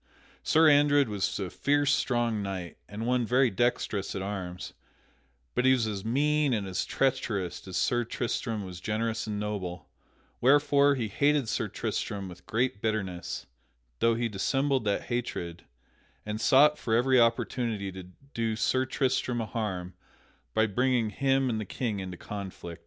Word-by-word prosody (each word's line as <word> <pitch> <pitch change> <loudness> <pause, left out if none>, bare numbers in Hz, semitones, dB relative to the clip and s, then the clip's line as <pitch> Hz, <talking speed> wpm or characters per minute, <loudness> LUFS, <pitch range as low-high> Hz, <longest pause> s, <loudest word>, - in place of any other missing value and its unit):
Sir 160 +1 +4
Andred 145 -2 +5
was 100 -2 -1
a 95 -3 -4
fierce 145 0 +2
strong 120 -4 +1
knight, 95 -3 -5
and 105 +2 -5
one 125 0 +2
very 125 +2 +3
dextrous 105 -2 0
at 95 - -3
arms; 95 -3 -5 0.8
but 125 - +1
he 130 0 +6
was 125 -3 +1
as 100 -3 -3
mean 145 +4 +2
and 105 -3 -1
as 95 -2 -2
treacherous 100 -10 -1
as 95 - -3
Sir 120 0 +2
Tristram 115 -3 -3
was 90 -2 -8
generous 110 +2 -2
and 105 -1 -3
noble, 100 -4 -4 0.5
wherefore 145 +1 +5
he 120 -4 -2
hated 145 +4 +2
Sir - - -1
Tristram 100 -2 -3
with 90 0 -12
great 115 -2 0
bitterness 100 -6 -3 0.5
(though 115 0 +3
he 120 +1 0
dissembled 135 +5 0
that 100 -1 0
hatred) 100 -8 -4 0.6
and 105 +1 -4
sought 150 +5 +5
for 110 - 0
every 130 +2 +4
opportunity 115 -3 +1
to 95 -1 -9 0.3
do 115 -1 -1
Sir 130 +4 +1
Tristram 130 -2 0
a 115 - -1
harm 95 -5 -4 0.6
by 110 - +4
bringing 120 +1 +1
him 135 +1 +1
and 110 -3 -1
the - - -2
King 105 +1 -3
into 95 -2 -6
conflict. 95 -5 -7
115 Hz, 155 wpm, -28 LUFS, 100-130 Hz, 0.8 s, he